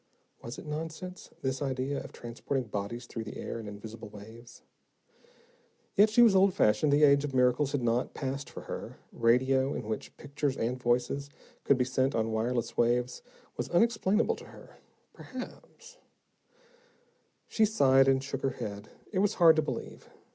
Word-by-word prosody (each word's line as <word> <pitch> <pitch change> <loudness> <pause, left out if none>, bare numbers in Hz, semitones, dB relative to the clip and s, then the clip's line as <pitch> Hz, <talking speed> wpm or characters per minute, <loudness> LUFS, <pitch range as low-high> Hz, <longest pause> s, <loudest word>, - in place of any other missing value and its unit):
Was 115 - -7
it - - -9
nonsense, 160 +4 -6
this 130 +1 -1
idea 135 0 -2
of - - -10
transporting 120 +3 -4
bodies 105 +3 -5
through 115 -1 -6
the 105 - -8
air, - - -5
in 110 - -8
invisible 105 +2 -9
waves? 110 +3 -13 1.3
Yet, 210 +2 +6
she 240 +3 +6
was 220 -4 +6
old 190 0 +4
fashioned; 140 +8 +3
the 145 +1 +4
age 140 -1 +6
of 140 -2 -4
miracles 125 +2 +3
had 140 -3 -1
not 120 +2 0
passed 135 0 -4
for - - -9
her. - - -7
Radio, 130 +4 +2
in - - -5
which 110 - -5
pictures 140 -1 -3
and 125 +3 -2
voices 125 +4 0 0.3
could 140 - +4
be 125 - +2
sent 130 +1 0
on 110 0 0
wireless 115 +2 -1
waves, 120 +1 +1 0.4
was - - -3
unexplainable 215 +1 +2
to - - -11
her. - - -15 0.4
Perhaps 465 - -10 1.5
She 220 - +1
sighed, 135 -11 +4
and 135 0 +3
shook 135 -1 -4
her 135 - -2
head. 100 0 -6 0.2
It 190 - 0
was 205 0 +2
hard 165 -3 +7
to - - +4
believe. - - -6
130 Hz, 165 wpm, -30 LUFS, 120-150 Hz, 1.5 s, hard